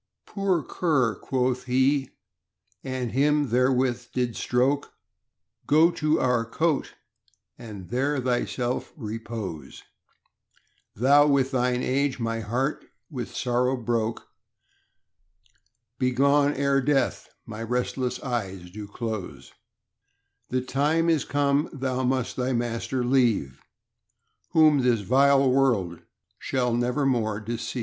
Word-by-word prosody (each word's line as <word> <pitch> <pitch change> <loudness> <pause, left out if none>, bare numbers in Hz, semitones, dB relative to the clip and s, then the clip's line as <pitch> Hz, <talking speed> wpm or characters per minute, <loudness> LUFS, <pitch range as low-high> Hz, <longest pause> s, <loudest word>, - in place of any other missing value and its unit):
Poor 190 -5 -1
cur, 135 -11 +1
quoth 125 +4 -2
he, 130 +2 +2 0.7
and 130 -3 -3
him 145 +1 +2
therewith 125 0 +1
did 125 -3 -1
stroke, 130 +4 0 0.7
Go 160 +4 +5
to 155 -1 0
our 125 -2 +2
cote 150 +6 -1 0.6
and 105 -6 -9
there 135 +4 0
thyself 125 0 -2
repose; 110 - -6 1.1
Thou 140 +6 +5
with 135 -2 +2
thine 125 -1 0
age 135 0 0
my 115 -1 -2
heart 125 +7 -2 0.3
with 125 -5 -6
sorrow 125 +1 0
broke. 115 -2 -2 1.7
Begone 140 +3 +3
ere 140 0 +2
death 135 -2 0 0.2
my 115 -1 -8
restless 125 +2 -2
eyes 95 -8 -4
do 105 +1 -8
close; 110 -3 -6 1.0
The 130 0 0
time 150 +6 +1
is 155 -4 +1
come 145 +1 +1
thou 130 -3 -2
must 130 -1 -1
thy 130 +1 0
master 120 +2 -2
leave, 115 - +1 0.9
Whom 155 -3 +5
this 125 -4 +2
vile 135 +5 +4
world 115 -11 +1 0.4
shall 125 -3 -1
never 125 +4 0
more 110 -5 0
deceive. 115 +3 -5
125 Hz, 110 wpm, -25 LUFS, 115-140 Hz, 1.7 s, Go